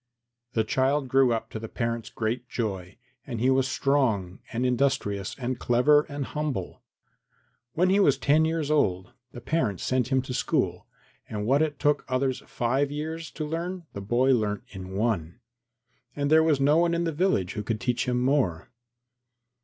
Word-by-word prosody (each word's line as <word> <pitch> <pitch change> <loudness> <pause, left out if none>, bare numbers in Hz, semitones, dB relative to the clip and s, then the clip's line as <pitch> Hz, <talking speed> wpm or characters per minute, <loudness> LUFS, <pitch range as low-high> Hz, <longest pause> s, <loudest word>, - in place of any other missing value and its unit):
II 120 -1 -58
The 110 - +2
child 130 +4 +1
grew 135 -1 +4
up 115 -1 -2
to 110 - -5
the 115 0 -7
parents' 115 -2 -3
great 120 +2 -3
joy; 95 -5 -4 0.3
and 120 -4 -4
he 130 +3 +3
was 130 0 +2
strong 115 -11 0
and 125 +1 -1
industrious 125 -6 0
and 125 -2 -3
clever 145 +6 +4
and 140 -1 -4
humble. 145 -13 -4 0.9
When 180 +3 +2
he 200 - +4
was 145 -9 +4
ten 150 +3 +3
years 160 -2 -1
old 95 -7 +1 0.2
the 120 - -9
parents 120 - -1
sent 130 -2 +1
him 130 -1 +1
to 130 - -5
school, - - -1 0.4
and 105 -1 -3
what 135 +6 +3
it 150 -3 0
took 145 +1 +1
others 130 0 0
five 130 +4 0
years 160 +3 -5
to 155 - -5
learn 170 +3 -4
the 100 - -6
boy 120 +6 +2
learnt 105 -4 0
in 95 -2 -8
one. 100 -4 -1 0.8
And 145 0 -1
there 160 0 +7
was 160 -3 +2
no 145 +3 +4
one 170 0 +3
in 170 - 0
the 165 - 0
village 145 - 0
who 105 - -3
could 110 +1 -3
teach 125 0 -1
him 125 0 +1
more. 125 - 0
130 Hz, 180 wpm, -26 LUFS, 115-145 Hz, 0.9 s, there